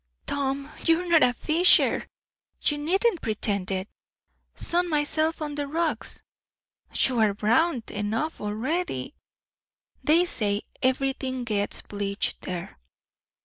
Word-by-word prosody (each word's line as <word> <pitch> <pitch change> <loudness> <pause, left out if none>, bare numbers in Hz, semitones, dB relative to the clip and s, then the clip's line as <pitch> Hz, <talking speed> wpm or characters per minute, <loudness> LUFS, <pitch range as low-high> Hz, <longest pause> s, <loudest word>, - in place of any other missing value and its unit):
"Tom! 275 0 -2 0.2
you're 330 +2 +3
not 335 -2 +5
a 245 - +5
fisher. 320 +8 +4 0.6
You 295 -1 +2
needn't 370 +5 +1
pretend 205 -3 -1
it." 190 0 -2 0.7
"Sun 350 +1 0
myself 310 +1 +1
on 295 -1 -4
the 290 -1 -3
rocks." 320 +2 -2 0.7
"You 250 -3 +2
are 210 -2 +3
brown 235 +6 +2
enough 225 +10 -2
already." 260 +13 -2 0.9
"They 330 +4 +4
say, 205 -10 -1 0.2
everything 260 0 0
gets 210 -3 -2
bleached 200 0 -2
there." 175 - -6
270 Hz, 110 wpm, -26 LUFS, 210-320 Hz, 0.9 s, not